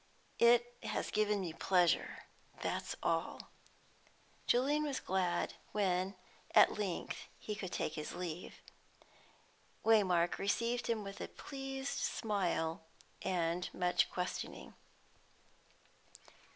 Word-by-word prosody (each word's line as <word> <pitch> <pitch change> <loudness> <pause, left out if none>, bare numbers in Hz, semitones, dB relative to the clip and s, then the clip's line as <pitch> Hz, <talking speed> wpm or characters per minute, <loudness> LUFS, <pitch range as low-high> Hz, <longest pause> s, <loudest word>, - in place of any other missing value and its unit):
"It 240 +1 +5
has - - -2
given 210 -1 +2
me 170 -4 -3
pleasure, 180 0 +2 0.4
that's - - -2
all." - - -1 1.0
Julian 280 +5 +3
was 290 -3 -1
glad 180 -2 0 0.2
when 190 -1 +1 0.4
at - - +7
length 190 -5 -3
he 215 - -4
could 195 -3 -5
take 155 - -1
his 155 -1 -5
leave. 175 -1 -6 1.2
Waymark 185 -6 +4
received 235 +4 0
him 225 -2 0
with 195 0 -7
a - - -3
pleased 270 -1 -5
smile, 180 -7 0 0.4
and 175 -1 0
much 180 -1 +2
questioning. 180 0 -4
195 Hz, 100 wpm, -35 LUFS, 180-230 Hz, 1.2 s, at